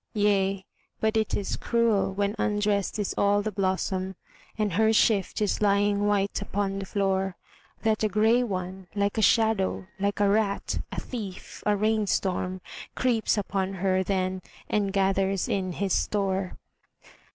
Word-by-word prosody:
Yea, 195 -2 +1 0.3
but 220 0 +1
it 220 -1 +1
is 200 - -2
cruel 230 -5 +1
when 200 +2 -1
undressed 205 -1 0
is 205 -2 -1
all 205 0 +3
the 215 - -2
blossom, 190 -1 -1 0.4
And 210 -4 0
her 220 +4 +4
shift 215 -3 +2
is 205 - 0
lying 205 0 +2
white 200 -1 +1
upon 195 0 -2
the 195 - -6
floor, 195 -2 0 0.5
That 220 -2 +1
a 215 - +2
grey 220 +4 +3
one, 190 -4 -4
like 200 +2 0
a - - +2
shadow, 220 -3 +2
like 200 +1 -1
a 205 - +4
rat, 200 0 0
a - - -3
thief, 205 -7 -7
a 210 - +4
rain 215 0 +1
storm 185 -1 -1 0.3
Creeps 235 -4 +1
upon 195 -1 -1
her 190 0 +1
then 185 0 -1 0.3
and 205 -2 0
gathers 195 -1 +1
in 185 -2 -1
his 195 +1 -1
store. 195 -2 0
200 Hz, 150 wpm, -27 LUFS, 190-210 Hz, 0.5 s, her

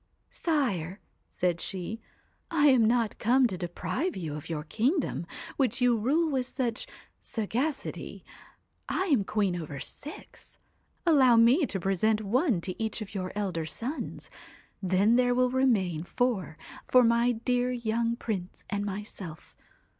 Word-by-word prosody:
* - - -45
Sire! 205 - -1 0.2
' - - -46
said 175 -2 -1
she, 195 +4 -4 0.2
* - - -41
I 295 -3 +4
am 250 -4 +5
not 230 -1 +1
come 255 +3 +4
to 220 - 0
deprive 180 - -3
you 160 -5 -4
of 150 +2 -7
your 155 -2 -3
kingdom, 240 - 0 0.3
which 265 -3 +1
you 245 -1 +4
rule 280 +10 +2
with 260 -2 0
such 245 -3 -2 0.3
sagacity. 245 +7 -3 0.6
I - - 0
am 225 -7 +3
queen 200 -3 0
over 145 -3 -6
six. 295 - -9 0.5
Allow 270 -8 +6
me 245 +7 +5
to 195 - -3
present 195 +4 +1
one 230 - +1
to 185 +4 -5
each 220 0 -2
of 200 - -12
your 185 -2 -3
elder 180 -6 -2
sons; 250 - -5 0.5
then 195 +5 +3
there 245 -1 +3
will 250 0 +3
remain 205 -11 +2
four 195 -6 -1 0.3
for 255 -1 +6
my 235 +1 +3
dear 245 +2 0
young 235 -1 0
Prince 195 -7 -5
and 205 0 -1
myself. 195 -5 -7
225 Hz, 150 wpm, -29 LUFS, 185-250 Hz, 0.6 s, Allow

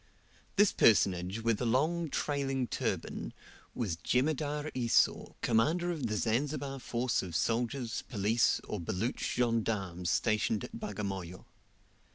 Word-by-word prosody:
This 205 0 +5
personage 95 -1 +3
with 115 -1 +1
a - - 0
long 155 +7 +1
trailing 135 -3 -1
turban, - - -3 0.4
was 100 -10 -2
Jemadar 145 - 0
Esau, 120 -3 +2
commander 160 +10 +2
of 150 -8 -2
the 105 -1 -1
Zanzibar 135 +5 -1
force 125 0 0
of 90 -4 -6
soldiers, 120 - 0
police, 110 0 +2
or 105 - -3
Baluch 95 +9 -2 0.2
gendarmes 105 -7 0
stationed 110 +1 +1
at 225 - -8
Bagamoyo. 95 - -5
120 Hz, 120 wpm, -32 LUFS, 105-140 Hz, 0.4 s, This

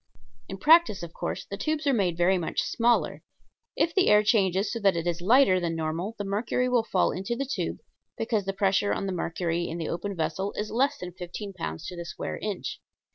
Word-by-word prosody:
In 195 - -5
practice, 310 - +5
of 170 -1 -8
course, - - -4
the 200 - -6
tubes 310 +3 -2
are 280 - +3
made 185 -7 +1
very 180 +2 +3
much 165 - -1
smaller. 235 0 +1 0.5
If 335 - +1
the 380 -2 +3
air 210 0 +6
changes 195 -3 +2
so 230 - -3
that 195 -4 +3
it 165 0 -2
is 175 0 -1
lighter 200 -1 +5
than 170 -2 -2
normal 165 +7 -3
the 205 - -3
mercury 215 +5 0
will 250 -2 +3
fall 190 -4 +1
in 185 - -4
the 235 +7 -2
tube, 280 - -2 0.4
because 225 -3 -1
the 195 - 0
pressure 195 +1 +2
on - - -2
the 190 - -2
mercury 170 0 -2
in 165 - -4
the 165 -2 -3
open 195 +4 -3
vessel 165 +5 -2
is 210 +1 -4
less 265 +5 +1
than 180 0 -7
fifteen 180 +3 -7
pounds 80 - -5
to 180 - -6
the 170 -1 -6
square 170 - -5
inch. 205 -3 -4
195 Hz, 220 wpm, -27 LUFS, 175-225 Hz, 0.5 s, air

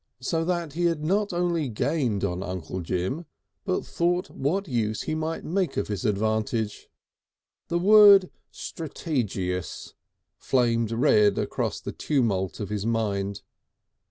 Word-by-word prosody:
So 160 +6 -1
that 170 -4 -2
he 175 +2 0
not 195 +7 0
only 175 -4 0
gained 120 -3 0
on 90 -2 -1
Uncle 95 -1 -5
Jim, 95 - -2 0.4
but 185 -2 -1
thought 175 +2 0
what 185 +8 -1
use 110 -5 -1
he - - -2
might 160 +1 -3
make 180 -2 -1
of - - -1
this 105 +4 -3
advantage. 110 +1 -1 0.8
The 170 - 0
word 200 0 +7 0.2
"strategious" 100 - -4 0.5
flamed 115 -3 +1
red 110 -4 +4
across - - -2
the - - -6
tumult 110 - 0
of 105 - -4
his 105 -2 -2
mind. 100 -3 -1
125 Hz, 130 wpm, -26 LUFS, 105-170 Hz, 0.8 s, word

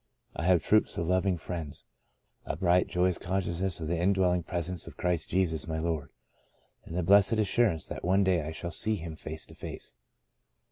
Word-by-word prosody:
I 80 - -3
have 90 -3 +4
troops 110 0 +3
of 85 - -1
loving 95 0 +2
friends, 80 -3 -6 0.6
a - - -3
bright, 90 +2 +3
joyous 90 0 +1
consciousness 95 -1 -2
of 80 - -4
the 85 +1 -1
indwelling 90 -1 +2
presence 85 0 -4
of - - -11
Christ 90 -3 -1
Jesus 85 -4 0
my 80 -1 -2
Lord, 80 -3 -2 0.8
and 85 - -6
the 90 - +1
blessed 100 +3 +5
assur 110 +2 +3
ance 80 -7 -3
that - - -7
one 95 +3 +3
day 95 -3 +2
I 75 +1 -5
shall 85 +2 -5
see 110 +5 0
Him 80 -4 -6
face 80 0 -7
to - - -14
face.'' - - -8
90 Hz, 190 wpm, -29 LUFS, 80-95 Hz, 0.8 s, blessed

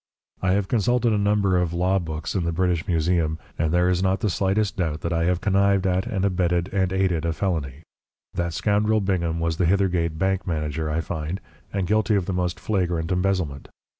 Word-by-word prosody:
I 95 0 +2
have 100 -1 +1
consulted 120 +1 +2
a - - +2
number 100 -2 +2
of 85 -2 -1
law 95 +2 +2
books 80 -1 -4
in 95 - 0
the 85 - 0
British 90 -1 0
Museum, 80 -1 +1 0.2
and 80 -1 +1
there 90 +1 +3
is 90 0 +1
not 95 0 +1
the 105 - +1
slightest 100 +2 0
doubt 80 -4 -1
that 85 - -2
I 85 0 +1
have 90 0 +1
connived 100 0 +2
at 95 0 +1
and 95 -1 -1
abetted 90 0 0
and 95 -2 +1
aided 95 -4 +1
a 85 0 0
felony. 80 -5 -2 0.5
That 85 -2 -2
scoundrel 105 +1 +2
Bingham 85 -4 0
was 85 -1 -1
the 90 - +2
Hithergate 90 -3 +1
bank 95 +2 0
manager, 75 -2 -2
I 80 +2 0
find, 80 +3 -4 0.3
and 100 -2 -1
guilty 110 +2 +2
of 95 -3 +1
the 95 - -2
most 90 -1 -1
flagrant 90 -5 -1
embezzlement. 90 -7 -1
90 Hz, 200 wpm, -24 LUFS, 85-95 Hz, 0.5 s, there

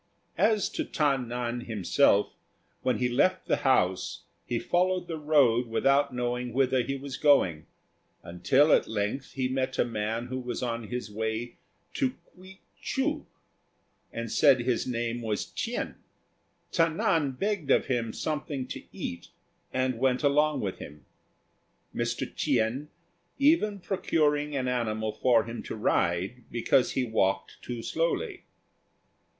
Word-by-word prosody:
As 215 -2 +3
to - - -3
Ta 145 -3 +1
nan 120 -1 -3
himself, 105 0 +2 0.5
when 130 -1 +1
he 125 - +1
left 185 +10 +2
the - - +1
house 95 -9 +1 0.2
he 120 - -1
followed 180 +6 +1
the 160 -2 -4
road 135 -6 +3
without 135 +5 +2
knowing 125 -1 -2
whither 130 0 +2
he 135 +3 -3
was 135 0 -6
going, 95 - +3 0.6
until 110 - +3
at - - +4
length 110 +5 -3
he 130 -1 0
met 130 0 -2
a - - +3
man 115 +1 -2
who 130 +1 -4
was 125 0 -4
on 115 -2 -3
his 125 -2 -5
way 110 +2 -3 0.4
to 260 -2 0 0.2
K'uei 185 +1 -14 0.2
chou, 300 +3 -1 0.8
and 115 -1 -5
said 135 -4 +5
his 120 0 0
name 120 -1 -2
was 110 -2 -2
Ch'ien. - - -3 0.8
Ta 165 - +4
nan 155 -3 +1
begged 195 0 -2
of - - +4
him 120 -3 -1
something 150 -2 -3
to - - -5
eat, 85 - -6 0.4
and 130 -2 0
went 130 +1 +1
along 150 0 +3
with 95 -3 -3
him; 75 0 -11 0.9
Mr. - - -1
Ch'ien 120 +7 0 0.5
even 280 -8 +3
procuring 150 -6 0
an 130 -2 -1
animal 110 -3 -1
for 120 0 +3
him 115 +1 -6
to - - -6
ride 95 +3 0
because 120 +2 +2
he 130 - +1
walked 100 -4 0
too 120 -2 -6
slowly. 360 - -2
125 Hz, 140 wpm, -28 LUFS, 115-150 Hz, 0.9 s, said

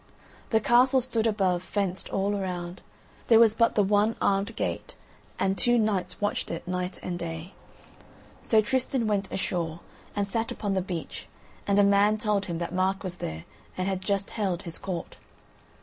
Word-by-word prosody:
The 220 - +3
castle 250 +4 +5
stood 235 -3 0
above, 190 -5 +1
fenced 190 -1 -2
all 200 +1 0
around. 180 -2 -4 0.5
There 225 -1 +7
was 225 -2 +6
but 230 +1 +2
the 210 - +4
one 210 +3 +2
armed 200 +3 +1
gate, - - -3 0.4
and 190 0 +1
two 240 +3 +3
knights 210 -5 0
watched 205 0 -1
it 165 0 -5
night 180 0 -3
and 175 -1 -3
day. 165 +2 -6 0.9
So 220 -1 +4
Tristan 255 +1 0
went 205 -2 0
ashore 170 -3 -2 0.4
and 205 -1 0
sat 225 +3 -1
upon 205 -2 -2
the 190 - +1
beach, 180 -3 -6 0.4
and 200 0 +3
a 205 - +6
man 200 +2 +4
told 210 -2 0
him 170 -2 -3
that 170 +1 -4
Mark 190 +1 0
was 180 -2 -4
there 80 +1 -5 0.3
and 185 0 -1
had 190 -1 -1
just 200 0 -1
held 195 -4 -2
his 170 -3 -3
court. 180 -3 -5
195 Hz, 175 wpm, -27 LUFS, 180-215 Hz, 0.9 s, There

